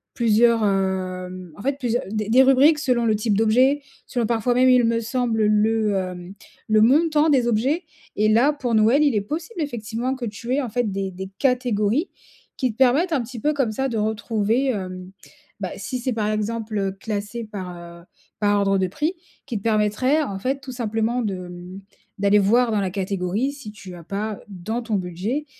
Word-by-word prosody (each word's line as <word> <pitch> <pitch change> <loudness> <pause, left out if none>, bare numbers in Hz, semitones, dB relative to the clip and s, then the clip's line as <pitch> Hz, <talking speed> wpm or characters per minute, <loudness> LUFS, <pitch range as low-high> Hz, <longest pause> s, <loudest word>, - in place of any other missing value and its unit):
plusieurs, 230 0 +3
hem, 185 -2 -2
en - - -9
fait 275 +4 -1
plusieurs 245 -2 -1
des 215 -1 -2
des 255 +4 +6
rubriques 270 +4 +5
selon 250 -6 +1
le 220 -1 +3
type 210 -1 0
d'objet, 255 +6 +3 0.2
selon 240 -3 -1
parfois 235 +2 +1
même 255 +1 +4
il 250 -1 +5
me 230 0 +2
semble 230 -1 0
le, 215 0 +2
hem, 180 -1 -4 0.3
le 215 0 +4
montant 305 +6 +4
des 260 -5 +3
objets 260 +10 +1 0.3
et 215 - +3
là 235 +7 +4
pour 250 -5 -2
Noël 225 +7 +4
il 285 -6 +2
est 210 - +2
possible 325 - -5
effectivement 235 -2 -3
que 255 -2 -5
tu 230 +3 -4
aies 285 - +2
en 250 - -4
fait 230 -1 -1
des 195 0 -2
des 190 +1 -7
catégories 250 - +1 0.5
qui 255 -4 0
te - - -27
permettent 275 +7 +3
un 280 - +2
petit 235 +1 -8
peu 300 +6 +1
comme 270 -6 0
ça 265 +5 -1
de 230 - -3
retrouver, 220 +3 0
hem, 185 -5 -4 0.5
bah, - - -2
si 255 - -4
c'est 250 +1 -2
par 215 -2 -1
exemple, 215 +1 -2
heu, 195 -1 0
classé 210 +3 -5
par, 190 -4 -7
heu, 170 0 -12 0.4
par 205 -1 +2
ordre 195 -1 +2
de 190 - +1
prix, 300 - -2 0.3
qui 240 -5 -3
te 200 - -8
permettraient 225 +7 +2
en 200 -9 -4
fait 265 +6 -1
tout 265 -1 -8
simplement 230 0 -1
de, 200 -3 -2
mmh, 180 +2 -9 0.4
d'aller 200 +1 +4
voir 230 +4 +3
dans 210 -2 +1
la 190 -2 -2
catégorie 195 +5 -1
si 275 -7 -9
tu 190 -4 -11
as 170 - -11
pas, 205 +4 -4
dans 205 +5 -4
ton 225 -2 -2
budget, 195 - -3
220 Hz, 200 wpm, -22 LUFS, 200-255 Hz, 0.5 s, des